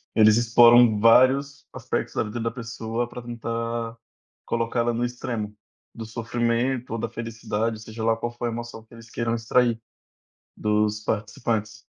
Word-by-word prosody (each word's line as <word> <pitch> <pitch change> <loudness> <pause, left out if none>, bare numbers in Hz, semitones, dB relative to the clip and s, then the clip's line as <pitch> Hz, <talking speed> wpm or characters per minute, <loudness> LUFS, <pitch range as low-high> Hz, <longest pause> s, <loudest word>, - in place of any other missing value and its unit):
Eles 110 0 +6
exploram 120 -1 +6
vários 135 +5 +4
aspectos - - -3
da - - +1
vida 110 +2 -5
da 115 0 -1
pessoa 115 0 -4
pra 125 - -8
tentar 115 -1 -4 0.5
colocar 115 +1 -1
ela 120 0 +1
no 120 +1 -1
extremo 120 -4 -4 0.4
do 115 - -7
sofrimento 120 +2 -1
ou - - -1
da - - -3
felicidade. 110 -1 -3
Seja 110 0 -7
lá 115 0 +3
qual 120 +1 -4
for 120 0 -6
a - - -2
emoção 115 -1 -7
que 110 - -21
eles 115 0 -13
queiram 115 0 -1
extrair 115 0 +2 0.8
dos 105 0 +1
participantes. 110 0 -2
115 Hz, 155 wpm, -24 LUFS, 110-120 Hz, 0.8 s, Eles